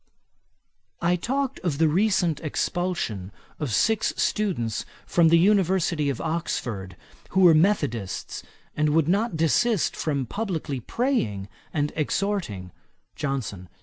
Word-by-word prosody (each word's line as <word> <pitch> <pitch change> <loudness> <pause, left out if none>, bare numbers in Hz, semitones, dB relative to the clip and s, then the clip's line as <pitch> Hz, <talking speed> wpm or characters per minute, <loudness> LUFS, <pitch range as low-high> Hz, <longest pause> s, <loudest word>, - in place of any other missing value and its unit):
I 175 +1 +2
talked 270 +8 -2
of 165 -6 -2
the 160 +1 +4
recent 175 -2 +2
expulsion 155 - -2 0.3
of 145 -6 -2
six 220 - +2
students 170 - 0 0.2
from 170 -1 +4
the 170 - +6
University 180 -5 +2
of 135 - -3
Oxford, 115 - -3 0.3
who 190 - +2
were 175 -3 +8
methodists 145 - 0 0.3
and 150 0 +1
would 160 -2 +3
not 200 0 +1
desist 195 +6 +2
from 140 -4 -1
publickly 165 - -3
praying 115 - -1 0.2
and 145 -1 -1
exhorting. 155 - -2 0.4
JOHNSON. 115 -10 -4
165 Hz, 115 wpm, -25 LUFS, 135-190 Hz, 0.4 s, were